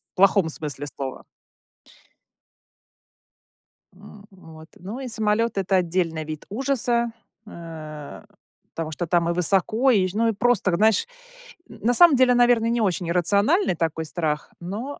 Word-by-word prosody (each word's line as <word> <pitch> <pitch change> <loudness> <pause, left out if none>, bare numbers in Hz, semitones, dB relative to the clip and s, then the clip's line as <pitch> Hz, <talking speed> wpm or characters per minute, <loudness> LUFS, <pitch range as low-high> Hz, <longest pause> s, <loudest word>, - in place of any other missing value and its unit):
плохом 195 -3 +4
смысле 145 -2 -6
слова. 135 -1 -6 2.7
М, 205 -1 -15
вот. 160 -3 -15
Ну, 205 +8 -7
и 265 - -6
самолет- 220 -1 0
это 195 0 0
отдельный 170 -2 -1
вид 155 -1 -7
ужаса, 235 -1 0 0.4
э, 155 -5 -9 0.5
потому 160 -1 -5
что 170 +2 -4
там 170 0 +1
и 170 - +1
высоко, 200 +8 +2
и 195 -6 +3
ж 185 - -8
ну 230 +2 +1
и 225 - +1
просто, 205 -5 +1
знаешь, 215 +3 +3 0.6
на 245 +2 -1
самом 340 0 +7
деле, 255 -1 +4
наверное, 240 -2 +3
не 235 0 0
очень 185 -3 -1
иррациональный 200 - +2
такой 160 -1 -2
страх, 155 -2 -3
но 215 +11 -6
195 Hz, 135 wpm, -23 LUFS, 165-230 Hz, 2.7 s, самом